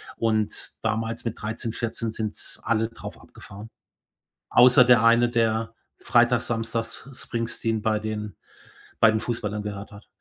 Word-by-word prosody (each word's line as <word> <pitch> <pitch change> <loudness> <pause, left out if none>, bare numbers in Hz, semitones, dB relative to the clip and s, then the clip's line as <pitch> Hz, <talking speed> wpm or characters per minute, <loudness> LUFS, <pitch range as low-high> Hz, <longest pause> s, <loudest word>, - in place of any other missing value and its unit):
und 110 -2 0 0.3
damals 115 +2 -2
mit 115 - -4
13, 110 +1 -4
14 115 -1 -3
sind 110 -1 -4
alle 115 -1 +1
drauf 115 - -10
abgefahre. 105 +3 -12 0.8
Außer 125 +1 +7
der 120 -2 +5
eine, 120 +1 +5
der 115 -1 0 0.2
Freitag, 120 0 +3
Samstags 115 +2 -4
Springsteen 115 -2 -3
bei 110 -1 +1
den 105 -3 -5 0.6
bei 115 - +6
den 110 - 0
Fußballern 105 -3 -3
gehört 105 0 -6
hat. 100 +1 -14
115 Hz, 135 wpm, -25 LUFS, 110-115 Hz, 0.8 s, Außer